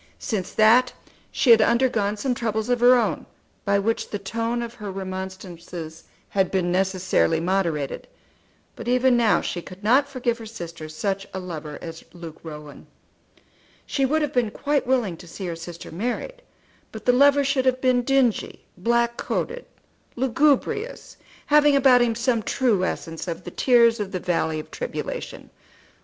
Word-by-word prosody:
Since 200 -7 -3
that 235 +4 +5 0.4
she 250 - +3
had 225 -1 +8
undergone 225 -3 +2
some 255 +4 -1
troubles 220 -1 -2
of 245 -1 +2
her 245 +1 +7
own 245 - 0 0.4
by 200 0 +3
which 225 +3 -1
the 205 - -3
tone 230 +4 -2
of 235 0 -7
her 210 -4 -7
remonstrances 185 -4 -7 0.2
had 190 -2 +1
been 180 -2 0
necessarily 185 -3 +1
moderated; 170 -5 -1 0.7
but - - -8
even 250 +1 +3
now 230 -3 +3
she 175 - -4
could 185 +3 -12
not 265 +6 +4
forgive 245 -3 -2
her 225 - -8
sister 170 -7 -8
such 195 +5 -3
a - - -2
lover 160 -5 -7
as 165 -1 -8
Luke 170 -3 -10
Rowan. 150 -2 -10 1.0
She 275 - -1
would 305 +4 +2
have 295 -1 -2
been 245 -3 +1
quite 285 +3 -1
willing 240 -10 +1
to 175 - -13
see 190 +3 -7
her 170 -2 -3
sister 170 +1 -9
married, 245 - -4 0.5
but 220 -1 -9
the 245 - +4
lover 285 +2 +5
should 270 -1 +1
have 255 0 +2
been 255 -1 +3
dingy, 260 -3 0
black 235 +5 +1
coated, - - -3 0.5
lugubrious, 280 - 0 0.3
having 295 -1 +5
about 260 -2 +6
him 235 -2 +2
some 235 0 +1
true 220 -4 +1
essence 165 -2 -4
of 170 -2 -5
the - - -8
tears 235 -2 +4
of 200 -2 -3
the 185 - -1
valley 165 -3 -1
of 155 - -10
tribulation. - - -6
225 Hz, 165 wpm, -24 LUFS, 185-250 Hz, 1.0 s, had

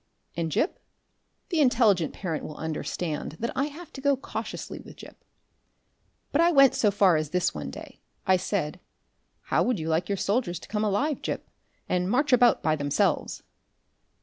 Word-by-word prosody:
And 165 0 -1
Gip? 320 - 0 0.7
The 340 -4 0
intelligent 225 - +4
parent 165 -5 -4
will 150 - -7
understand 160 0 -3
that 230 +8 -3
I 275 - +1
have 310 +4 -9
to 270 - -8
go 280 -1 +3
cautiously 270 - -6
with - - -12
Gip. - - -14 1.1
But 310 - +3
I 340 +1 +5
went 275 -5 +6
so 210 - +3
far 195 -4 +4
as 155 -1 -2
this 180 +2 +1
one - - -5
day. - - -10 0.3
I 190 - +5
said, 180 -3 -2 0.6
"How - - +1
would 250 -3 +1
you 160 0 -3
like 165 +4 0
your 200 - 0
soldiers 200 -3 0
to - - -11
come 210 0 -1
alive, 250 +8 0
Gip, - - -4 0.4
and 180 0 0
march 265 +4 +2
about 245 -1 +5
by 155 -1 +2
themselves?" 145 -1 0
200 Hz, 175 wpm, -27 LUFS, 165-260 Hz, 1.1 s, went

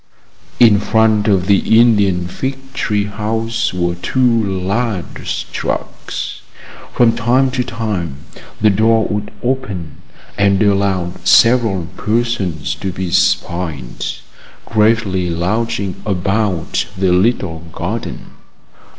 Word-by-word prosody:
In 110 -4 +6
front 110 0 +2
of 95 -4 +2
the 100 +3 +4
Indian 100 -7 +3
fig 135 +7 -5
tree 105 -5 0
house 110 +2 -2
were 85 -1 -1
two 115 +5 +1
large 100 +1 -2
trucks. - - -4 0.5
From 115 -2 +3
time 125 +3 +2
to 125 -1 -1
time 105 - -3 0.4
the 105 0 +4
door 110 +2 +3
would 105 0 -3
open, 105 - -3 0.4
and 100 -1 +3
allow 100 -3 +1
several 115 -7 +4
persons 105 - -1
to 95 +6 -4
be 90 -1 -4
spied, 85 -7 0 0.6
gravely 105 -5 +1
lounging 95 +3 -2
about 95 -2 -1
the 95 -1 +2
little 90 -3 +1
garden. - - -5
105 Hz, 105 wpm, -17 LUFS, 90-115 Hz, 0.6 s, In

